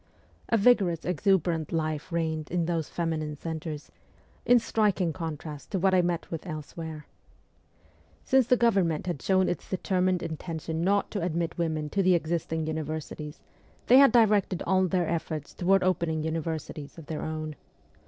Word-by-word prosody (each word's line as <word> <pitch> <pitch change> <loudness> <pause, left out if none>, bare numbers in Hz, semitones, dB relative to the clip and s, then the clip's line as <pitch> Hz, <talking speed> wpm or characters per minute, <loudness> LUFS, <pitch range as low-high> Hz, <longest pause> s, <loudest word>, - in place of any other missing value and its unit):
A 230 - +4
vigorous, 200 -7 +3
exuberant 175 -3 +1
life 155 -2 -2
reigned 160 -2 -1
in 175 -1 0
those 165 -2 -1
feminine 160 -3 -2
centres, 160 -1 -6 0.6
in 245 +1 +7
striking 205 -7 +1
contrast 155 -2 -6
to 200 - -1
what 190 +1 +2
I 185 - +5
met 175 -1 -2
with 165 +2 -5
elsewhere. 155 0 -6 1.2
Since 265 -3 +3
the 250 - +4
Government 195 -10 +2
had 175 -6 -3
shown 190 -1 +3
its 175 - -3
determined 185 -1 0
intention 160 0 -4
not 200 +2 +1
to 200 - -2
admit 170 -1 -1
women 160 -2 -1
to 200 - +1
the 185 -1 +4
existing 160 -1 -1
univer 155 0 -2
sities 150 0 -9 0.4
they 255 +2 +7
had 275 -1 +7
directed 210 -6 +3
all 190 -1 +3
their 180 -2 0
efforts 160 -2 -3
toward 190 +1 +2
opening 170 -4 0
universities 160 -2 -4
of 165 - -10
their 155 0 -4
own. 155 -1 -4
170 Hz, 155 wpm, -28 LUFS, 155-185 Hz, 1.2 s, in